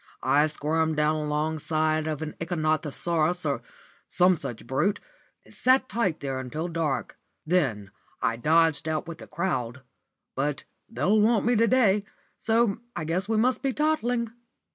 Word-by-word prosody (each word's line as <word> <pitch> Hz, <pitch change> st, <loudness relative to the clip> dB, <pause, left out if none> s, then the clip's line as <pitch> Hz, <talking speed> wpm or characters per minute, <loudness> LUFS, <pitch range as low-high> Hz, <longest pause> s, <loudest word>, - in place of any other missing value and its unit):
I 150 Hz, +2 st, +4 dB
squirmed 155 Hz, +1 st, 0 dB
down 150 Hz, +1 st, +2 dB
alongside 155 Hz, +1 st, 0 dB
of 155 Hz, -1 st, -3 dB
an 155 Hz, -, -5 dB
ichthyosaurus 165 Hz, +1 st, 0 dB
or -, -, -1 dB, 0.5 s
some 180 Hz, +1 st, +4 dB
such 120 Hz, -9 st, -6 dB
brute, 150 Hz, -, 0 dB, 0.5 s
and -, -, -17 dB
sat 260 Hz, 0 st, +3 dB
tight 195 Hz, -9 st, -1 dB
there 135 Hz, -2 st, -3 dB
until 150 Hz, +6 st, -4 dB
dark. 165 Hz, -5 st, -2 dB, 0.3 s
Then 130 Hz, -, 0 dB, 0.3 s
I 115 Hz, -2 st, 0 dB
dodged 160 Hz, +3 st, +3 dB
out 160 Hz, +1 st, -2 dB
with 170 Hz, -2 st, -7 dB
the -, -, -10 dB
crowd. 130 Hz, -8 st, -3 dB, 0.5 s
But 140 Hz, +1 st, -2 dB, 0.3 s
they'll 215 Hz, -1 st, +2 dB
want 220 Hz, 0 st, +3 dB
me 240 Hz, +1 st, +3 dB
to 230 Hz, +1 st, +4 dB
day, 210 Hz, -5 st, +3 dB, 0.4 s
so 225 Hz, -2 st, +2 dB, 0.2 s
I -, -, -3 dB
guess 180 Hz, +6 st, -2 dB
we 220 Hz, -, +2 dB
must 245 Hz, +3 st, +2 dB
be 270 Hz, -1 st, 0 dB
toddling." 245 Hz, -7 st, 0 dB
160 Hz, 150 wpm, -26 LUFS, 150-210 Hz, 0.5 s, I